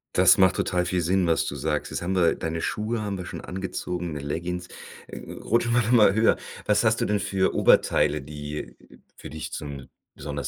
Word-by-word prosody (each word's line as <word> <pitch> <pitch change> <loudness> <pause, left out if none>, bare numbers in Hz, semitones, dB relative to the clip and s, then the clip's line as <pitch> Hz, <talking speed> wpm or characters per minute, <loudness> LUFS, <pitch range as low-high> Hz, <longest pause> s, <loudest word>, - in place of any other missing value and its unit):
Das - - +6
macht 95 -1 +4
total 90 -1 0
viel 90 0 0
Sinn, 90 +2 +1
was 80 - +2
du - - -4
sagst. - - -2
Jetzt - - -3
haben 90 +2 -2
wir 85 -3 +3
deine 80 0 -3
Schuhe 110 +2 -2
haben 100 -2 -3
wir 90 - -6
schon - - -7
angezogen, 90 -2 -4
'ne 75 - -5
Leggings. 90 +4 -4 0.4
Äh, - - -9
äh, - - -9
rutschen 120 +1 +1
wir 120 - +4
doch 115 - -1
mal 110 -5 +6
höher. 110 +2 +3 0.3
Was 105 +2 +2
hast 110 0 +2
du - - +2
denn 105 -1 0
für 95 -1 0
Oberteile, 75 0 +3
die 75 -3 -7 0.4
für - - -9
dich 80 -1 -7
zum 70 -3 -7 0.3
besonders 70 -1 -5
90 Hz, 210 wpm, -25 LUFS, 75-100 Hz, 0.4 s, Das